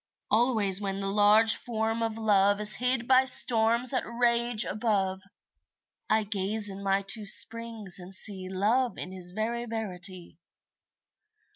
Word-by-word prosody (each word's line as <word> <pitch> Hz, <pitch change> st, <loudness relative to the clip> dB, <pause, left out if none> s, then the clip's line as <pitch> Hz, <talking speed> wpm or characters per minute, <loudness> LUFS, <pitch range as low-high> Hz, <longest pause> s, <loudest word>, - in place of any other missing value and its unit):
Always 215 Hz, -4 st, +2 dB
when 195 Hz, -1 st, -4 dB
the 195 Hz, 0 st, -3 dB
large 210 Hz, +2 st, +5 dB
Form 225 Hz, -1 st, -3 dB
of 225 Hz, -1 st, -3 dB
Love 205 Hz, -2 st, +2 dB
Is 210 Hz, 0 st, +1 dB
hid 250 Hz, -1 st, -1 dB
by 260 Hz, 0 st, +4 dB
storms 240 Hz, -2 st, +3 dB
that 255 Hz, -, 0 dB
rage 235 Hz, -1 st, +1 dB
above, 195 Hz, -3 st, -2 dB, 0.9 s
I 220 Hz, 0 st, +2 dB
gaze 205 Hz, +1 st, -1 dB
in 195 Hz, 0 st, -9 dB
my 195 Hz, 0 st, 0 dB
two 210 Hz, +1 st, 0 dB
springs 225 Hz, -3 st, 0 dB
and 180 Hz, +1 st, -11 dB
see 190 Hz, -1 st, -3 dB
Love 225 Hz, +7 st, -1 dB
in 180 Hz, -, -7 dB
his 185 Hz, -1 st, -8 dB
very 225 Hz, +5 st, -4 dB
verity. 185 Hz, -6 st, -4 dB
215 Hz, 140 wpm, -27 LUFS, 195-230 Hz, 0.9 s, large